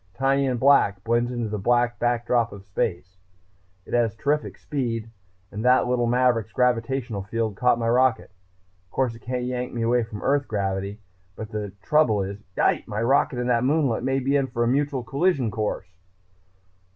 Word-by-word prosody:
Tiny 135 +2 +2
and 125 -2 -1
black, 115 -8 +4
blends 120 +1 +1
into 120 -3 -3
the 105 0 -3
black 120 +3 +1
backdrop 120 -1 +1
of 100 -1 -10
space. 90 -1 -3 0.7
It - - -10
has 115 -2 +2
terrific 145 +6 -1
speed. 115 -5 -3 0.4
And 105 +2 -5
that 125 +1 +4
little 125 -1 +1
maverick's 120 -3 +2
gravitational 120 -2 0
field 110 +1 -2
caught 125 +1 +3
my 115 -1 -2
rocket.... 125 -2 +2 0.6
Of - - -38
course 130 -3 0
it 115 - -12
can't 125 0 -3
yank 125 0 -3
me 115 - -1
away 120 +1 +2
from 110 -2 -7
Earth 140 0 +1
gravity, 100 -1 -2 0.4
but 110 -1 -8
the 105 -2 -4
trouble 125 -10 +3
is 100 +1 -6 0.2
yipe! - - +1
my 105 +2 -2
rocket 135 +1 +2
and 125 0 -1
that 115 0 +2
moonlet 140 -4 +1
may 135 +1 +1
be 135 +2 0
in 140 -2 +2
for 120 -1 -1
a - - +1
mutual 140 0 0
collision 135 - 0
course...." 105 -1 -2
120 Hz, 180 wpm, -24 LUFS, 110-130 Hz, 0.7 s, black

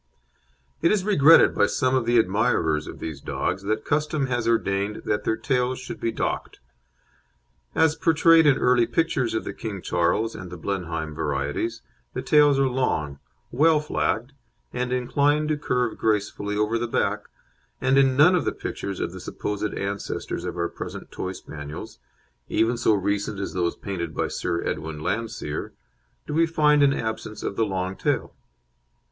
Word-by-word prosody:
It 170 - +4
is 210 -3 +2
regretted 165 -6 +6
by - - +3
some 130 -2 0
of 130 -3 +1
the 120 0 +4
admirers 95 -7 +2
of - - -8
these 75 -3 -6
dogs 95 - -2
that 110 +2 -2
custom 150 -1 0
has 120 -3 -1
ordained 100 -2 0
that 105 - -1
their 110 - +1
tails 125 +1 0
should 130 - -7
be 115 - -1
docked. - - -3 1.2
As 160 -1 +3
portrayed 165 -1 +5
in 140 -2 +5
early 125 -2 +3
pictures 130 -3 0
of 110 - -1
the - - -5
King 105 -4 -5
Charles 90 +7 0
and 95 - -8
the 90 - -8
Blenheim 80 -4 -3
varieties, 75 +10 -2 0.3
the - - -3
tails 145 -2 +5
are 135 0 +3
long, 80 - -1 0.3
well 155 +4 +4
flagged, 135 -4 -1 0.4
and 125 0 -2
inclined 145 +4 +1
to 155 - +1
curve 125 -5 -1
gracefully 105 -1 -1
over 105 +2 +1
the 120 - -2
back, - - -1 0.5
and 130 +1 +2
in 135 -1 +4
none 160 +6 +7
of 180 -5 +2
the - - -1
pictures 100 -1 -5
of - - -2
the 95 - -9
supposed 105 +3 -3
ancestors 100 0 -4
of - - -4
our 85 0 0
present - - -8
Toy 95 0 -4
Spaniels 75 -4 -9 0.5
even 115 +2 +2
so 115 -2 +3
recent 100 +1 -1
as 100 - -4
those 90 -2 0
painted 85 -5 -5
by - - -1
Sir 85 - -2
Edwin 80 -1 -4
Landseer 105 -4 -3 0.5
do - - -5
we 165 +2 +3
find 150 -2 +3
an 140 -1 +5
absence 110 -4 -4
of - - -3
the 110 +1 +1
long 95 -1 -2
tail. - - -1
115 Hz, 170 wpm, -24 LUFS, 95-135 Hz, 1.2 s, none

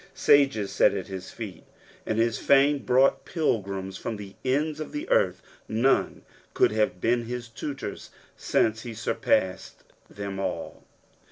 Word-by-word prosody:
Sages 135 -8 +3
sat - - +4
at - - -3
his 95 -1 -6
feet, 100 -7 -8 0.4
and 110 - -1
his 115 -1 +1
fame 140 +1 +4
brought 130 +1 +3
pilgrims 100 - -2
from 110 - -4
the 100 -1 -9
ends 145 +4 0
of 155 - -6
the 295 +3 -4
earth: - - +2 0.2
none 120 +5 +1 0.3
could - - +4
have 105 -4 0
been 120 +3 +1
his 120 0 -5
tutors, 125 0 -6 0.3
since 110 0 +1
he 115 -1 -7
surpassed 95 -3 -1 0.3
them 100 -1 -6
all. 90 -4 -4
115 Hz, 145 wpm, -26 LUFS, 100-135 Hz, 0.4 s, sat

